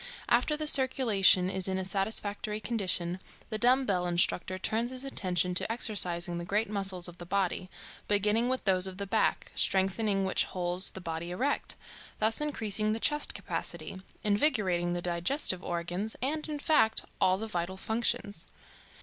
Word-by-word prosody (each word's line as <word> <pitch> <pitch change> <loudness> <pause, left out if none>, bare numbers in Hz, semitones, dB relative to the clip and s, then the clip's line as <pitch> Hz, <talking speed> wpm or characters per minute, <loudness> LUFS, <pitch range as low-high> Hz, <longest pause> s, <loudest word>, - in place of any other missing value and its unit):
After 245 +5 +2
the 310 - -2
circulation 235 -10 +4
is 190 0 -2
in 190 0 -1
a 190 - -3
satisfactory 205 +2 -1
condition, 185 -6 +1 0.3
the 215 - -2
dumbbell 240 -8 +2
instructor 175 +1 0
turns 225 +5 -2
his 260 +1 -5
attention 180 -8 -1
to 180 - 0
exercising 175 -7 0
the - - -5
great 210 +5 0
muscles 195 -3 +1
of 175 0 -12
the 175 - -8
body, 185 -1 -1 0.4
beginning 210 +4 +1
with 260 -2 -2
those 190 -1 +4
of 185 -1 -8
the 200 - -4
back, 195 - 0
strengthening 195 +1 +1
which 190 - +2
holds 180 +1 +2
the 190 - -8
body 165 0 -5
erect, 260 +11 -2 0.4
thus 220 +5 +1
increasing 215 -7 0
the 225 - -3
chest 295 +5 +1
capacity, 190 - -5 0.2
invigorating 205 - +1
the 175 0 -4
digestive 180 - +1
organs, 175 +5 -3
and, 305 +4 -2
in 300 - -3
fact, 285 -7 +2 0.2
all 185 0 +3
the 220 - -4
vital 185 -3 -4
functions. 215 -4 -1
195 Hz, 160 wpm, -29 LUFS, 180-225 Hz, 0.4 s, circulation